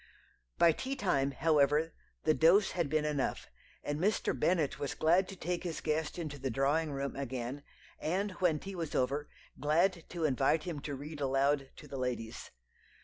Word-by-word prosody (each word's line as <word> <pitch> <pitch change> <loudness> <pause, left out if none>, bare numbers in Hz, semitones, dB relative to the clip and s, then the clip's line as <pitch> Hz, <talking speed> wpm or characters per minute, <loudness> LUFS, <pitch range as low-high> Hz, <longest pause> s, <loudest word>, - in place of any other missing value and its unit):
"By 170 - +6
tea 265 - -3
time, 140 - +1
however, 150 +2 +2 0.3
the 155 - +4
dose 180 +7 +5
had 170 -5 -1
been 155 0 +1
enough, 145 -3 -2 0.3
and 145 0 -2
Mr. 200 +4 +1
Bennet 165 -6 +1
was 140 - -3
glad 175 +4 +3
to 195 - -7
take 175 0 -3
his 170 -3 -3
guest 155 +1 -1
into 155 -5 -5
the 135 0 -2
drawing 145 +5 +1
room 140 0 -3
again, 130 0 -4 0.4
and 195 +6 -1
when 170 -4 +3
tea 195 +6 -7
was 165 -4 -4
over, 140 +3 0 0.3
glad 170 +4 +2
to 170 -3 -2
invite 140 +2 +2
him 170 -5 -4
to 145 0 -5
read 145 +2 -7
aloud 135 0 +2
to - - -12
the 135 - -6
ladies. 120 -2 -4
150 Hz, 175 wpm, -32 LUFS, 140-170 Hz, 0.4 s, By